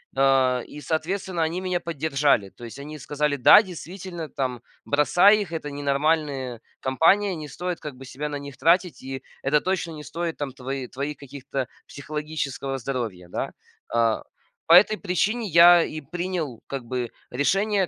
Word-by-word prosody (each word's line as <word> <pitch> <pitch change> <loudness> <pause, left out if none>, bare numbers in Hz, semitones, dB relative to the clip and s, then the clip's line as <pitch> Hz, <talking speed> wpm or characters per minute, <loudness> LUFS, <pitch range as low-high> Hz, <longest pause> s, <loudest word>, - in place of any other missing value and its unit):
э, 135 -2 +3
и, 150 - -10
соответственно, 170 +3 -2
они 160 +3 0
меня 180 -1 -1
поддержали. 145 - +1
То 120 - -11
есть 115 - -9
они 150 +2 -8
сказали: 145 +1 -1
"Да, 140 - +8
действительно, 180 -2 -7
там, 130 -3 -3 0.2
бросай 180 +8 +5
их. 185 -5 -5
Это 150 -3 -4
ненормальные 140 -3 0 0.2
компания. 180 +9 +3
Не 155 -1 -7
стоит, 180 +3 -4
как 150 -3 -7
бы, 135 +1 -11
себя 145 +3 -5
на 145 - -4
них 140 -2 -9
тратить. 170 +5 +2
И 130 0 -6 0.2
это 145 +2 +3
точно 185 0 -2
не 150 -1 -8
стоит 165 +2 -4
там 145 -2 -3
твои 135 0 -5
твоих 140 +4 -4
каких-то 135 -1 -5 0.2
психологического 145 -2 -4
здоровья". 115 -9 -4
Да. - - -4 0.4
А, 115 -1 +2 0.5
по 165 - +6
этой 200 +4 +7
причине 210 +5 0
я 170 0 +8
и 155 - -5
принял, 175 -8 -3
как 135 -2 -4
бы, 125 0 -3 0.2
решение 195 +9 +1
150 Hz, 160 wpm, -25 LUFS, 135-175 Hz, 0.5 s, Да